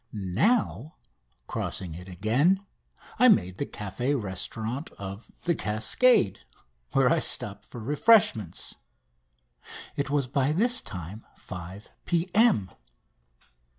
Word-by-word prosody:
Now, 125 - 0 0.5
crossing 90 -4 -4
it 90 +3 -10
again, 130 - +1 0.5
I 255 - +7
made 95 - +3
the 140 - -2
café 120 +7 -3
restaurant 110 - -4
of 100 +2 -9
"The 170 - +2
Cascade," 110 - +3 0.5
where - - +4
I - - +3
stopped 100 0 +1
for 120 - -10
refreshments. 145 - +2 1.2
It 140 -1 -2
was 145 -2 +1
by 135 +3 0
this 240 +8 +3
time 100 0 -8
5 90 +2 -9 0.2
P.M. 175 - +2
115 Hz, 105 wpm, -27 LUFS, 95-165 Hz, 1.2 s, I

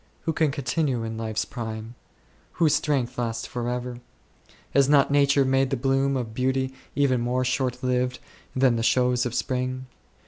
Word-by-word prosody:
Who 160 - -1
can 155 -2 +2
continue 135 -2 -1
in 110 0 -4
life's 110 0 -2
prime? 110 -1 -6 0.6
Whose 160 -3 +3
strength 135 -5 0
lasts 115 -1 -2
for 120 -1 -3
ever? 125 0 -4 0.7
Has 140 0 +4
not 140 -1 +5
Nature 140 -1 +4
made 135 0 +2
the 135 - -1
bloom 135 +1 +1
of 115 -3 -4
beauty 130 +2 0 0.2
even 130 -3 +2
more 125 +2 0
shortlived 125 0 0 0.4
than 130 -2 +3
the - - -1
shows 125 +1 +2
of 120 - -5
spring 130 0 -2
125 Hz, 160 wpm, -25 LUFS, 120-135 Hz, 0.7 s, not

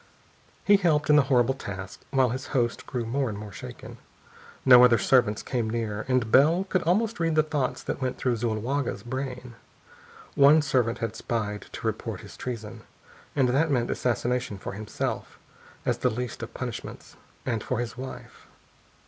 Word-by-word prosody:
He 205 0 +7
helped 155 -6 +2
in - - +7
the 150 - +7
horrible 125 -1 +4
task, 95 -7 -7
while 130 -2 +3
his 130 +3 -4
host 120 -1 -1
grew 125 -3 -3
more 130 +2 -1
and 105 - -5
more 105 0 -8
shaken. - - -10 0.7
No 125 -2 +9
other 120 -2 +6
servants 110 -1 +3
came 120 -4 -1
near. 110 -2 -3
And 130 -4 +1
Bell 160 +7 +5
could 185 -2 0
almost 210 +6 +1
read 165 -2 +1
the 155 - +5
thoughts 145 -4 -2
that - - -4
went 130 -1 -2
through 125 -2 0
Zuloaga's 120 +4 -2
brain. 125 0 -5 0.8
One 145 +2 +6
servant 125 -4 +1
had 115 -1 -3
spied, 105 -3 -3
to - - -7
report - - -3
his - - -12
treason. 115 -4 -6 0.5
And 130 -3 +3
that 145 +6 +2
meant 125 -4 +1
assassination 125 -2 -1
for 95 - -6
himself, 105 +1 -4 0.5
as - - 0
the - - +2
least 120 +1 -4
of 115 +1 -6
punishments, 120 -3 -6 0.3
and 115 -4 -1
for 125 - -2
his 120 -1 -3
wife.... 130 +1 -9
125 Hz, 170 wpm, -26 LUFS, 115-140 Hz, 0.8 s, No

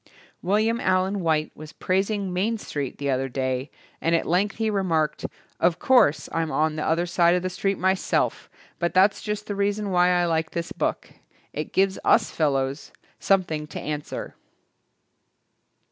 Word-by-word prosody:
Wil 195 +4 +1
liam 225 +2 +1
Allen 185 +2 +1
White 160 -3 0
was 155 0 -11
praising 195 0 -1
"Main 210 +6 0
Street" 145 - -5
the 140 -1 -1
other 135 +1 -1
day 130 +1 -2 0.3
and 165 +1 +2
at 165 - 0
length 190 +5 +1
he 220 -1 -1
remarked, 170 -6 0 0.3
"Of 170 0 +2
course, 245 - +3
I'm 165 -1 -1
on 155 0 0
the 155 - -3
other 165 +2 +1
side 170 0 +3
of 180 - -1
the 185 - -2
street 195 +2 -1
myself 190 +1 0 0.3
but 170 0 -1
that's 195 +2 +4
just 210 -1 -4
the 205 - -4
reason 200 0 -1
why 180 0 +4
I 175 -1 +2
like 160 -1 0
this 170 0 -4
book. - - -3 0.4
It 150 - -4
gives 190 0 +1
us 220 - +3
fellows 140 -2 -1 0.3
something 165 -6 +1
to - - -7
answer." 150 0 -5
175 Hz, 165 wpm, -24 LUFS, 155-195 Hz, 0.4 s, that's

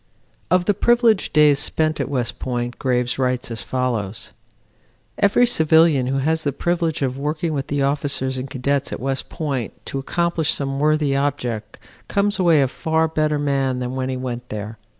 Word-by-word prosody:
Of 180 0 +3
the 205 - +3
privileged 235 0 +3
days 150 -2 +5
spent 155 +1 0
at 140 -2 -2
West 125 -4 -2
Point 120 -1 -3
Graves 125 -1 0
writes, 125 -2 0
as 115 -3 -4
follows: 115 -3 -3 0.9
"Every 210 +4 +4
civilian 160 - +4
who 135 +1 0
has 160 +4 +1
the 145 - 0
privilege 165 +1 -1
of 130 0 -2
working 155 +3 -2
with 135 -2 -3
the 145 -1 0
officers 140 -2 0
and 130 +2 -6
cadets 140 +2 -1
at - - -4
West 135 0 -2
Point 140 - -3
to 135 - -4
accomplish 170 +2 0
some 135 -1 -2
worthy 150 -1 +2
object 125 -6 -2 0.3
comes 200 0 0
away 165 -6 +4
a - - +1
far 160 +4 0
better 155 -1 0
man 135 -3 0
than 125 0 -3
when 130 0 -2
he 130 - -2
went 125 -1 -5
there. 105 +1 -6
140 Hz, 175 wpm, -21 LUFS, 130-160 Hz, 0.9 s, days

